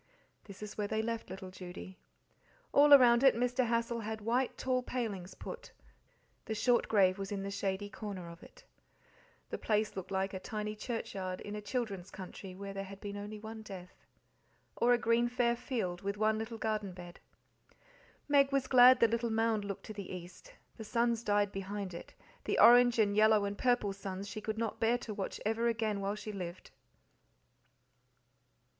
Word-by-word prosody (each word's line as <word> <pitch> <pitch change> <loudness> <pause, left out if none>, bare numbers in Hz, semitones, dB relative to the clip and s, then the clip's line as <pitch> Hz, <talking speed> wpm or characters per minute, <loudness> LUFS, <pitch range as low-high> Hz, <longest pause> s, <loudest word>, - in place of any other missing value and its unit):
This 200 0 -10
is 210 0 -8
where 205 - 0
they 220 +1 -1
left 230 -2 -3
little 190 0 -8
Judy. 185 0 -9 0.7
All 290 +1 +6
around 245 -4 +8
it 270 -4 +6
Mr. 245 +1 +1
Hassal 235 0 0
had 220 0 -4
white 240 +4 0
tall 255 -1 0
palings 210 -8 -4
put; - - -8 0.7
the 220 - -3
short 240 +3 +2
grave 195 -3 +3
was 195 0 -5
in 200 -1 -3
the 200 - -4
shady 200 0 -2
corner 200 -4 -7
of 170 +1 -11
it. - - -16 0.9
The - - -3
place 215 -1 0
looked 190 -2 -6
like 190 0 -1
a 190 - -4
tiny 210 +1 -4
churchyard 195 -5 -4
in 205 - -6
a 210 - -5
children's 205 -5 -3
country 185 0 -9
where 200 +1 -7
there 195 0 -4
had 195 0 -9
only 205 +1 -5
been - - -13
one 220 0 -7
death. 185 -4 -11 0.7
Or 240 - +3
a 245 - +6
green 235 +1 +2
fair 240 -1 +1
field, 225 -8 -3
with 200 +1 -3
one 215 +1 +2
little 225 +1 -5
garden 215 -4 -2
bed. 175 0 -11 1.1
Meg 280 -1 +4
was 275 -1 +1
glad 255 0 +7
the 230 - +7
little 230 +1 -1
mound 225 -1 +1
looked 200 -1 -6
to 215 - -7
the 200 -3 -7
east; 180 - -9 0.3
the 220 - -7
suns 235 +1 0
died 205 -1 +2
behind 195 -1 -5
it 170 - -10 0.3
the - - 0
orange 245 0 +7
and 205 -2 +3
yellow 215 -1 +5
and 200 0 -3
purple 245 -4 +1
suns 195 0 -6
she 210 +1 -6
could 220 +1 -3
not 225 -1 -2
bear 230 +2 +3
to 225 -3 -7
watch 200 -2 -4
ever 225 +2 +1
again 220 -3 0
while 200 +1 -1
she 215 0 -6
lived. 180 -3 -7
215 Hz, 185 wpm, -33 LUFS, 195-235 Hz, 1.1 s, around